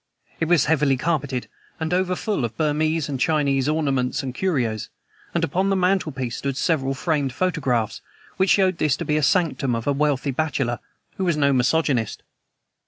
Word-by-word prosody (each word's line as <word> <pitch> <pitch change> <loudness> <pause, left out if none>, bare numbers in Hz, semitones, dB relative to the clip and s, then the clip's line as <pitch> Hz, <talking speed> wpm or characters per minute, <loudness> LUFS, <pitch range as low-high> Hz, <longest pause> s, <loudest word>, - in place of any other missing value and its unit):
It 160 - +1
was 170 -4 +4
heavily 145 -3 +2
carpeted, 140 -4 -1 0.3
and 160 +1 -2
over 185 0 +1
full 205 - -2
of 115 -1 -4
Burmese 155 0 +1
and 140 -3 -3
Chinese 140 -2 +2
ornaments 135 -6 0
and 130 -2 -4
curios, 125 - -1 0.5
and 170 - +1
upon 180 +5 +1
the 195 - +2
mantelpiece 160 -10 0
stood 135 -1 -3
several 135 -5 0
framed 145 -3 -1
photographs 130 - 0 0.4
which 190 0 +2
showed 190 -3 +3
this 150 -4 +2
to - - -4
be 150 - +1
the - - +1
sanctum 145 -5 +1
of 115 - -4
a 145 - +2
wealthy 145 -1 0
bachelor 135 -4 -1 0.4
who 190 - -1
was 170 -4 +1
no 140 -2 +3
misogynist. 130 -3 +1
150 Hz, 170 wpm, -23 LUFS, 130-165 Hz, 0.5 s, was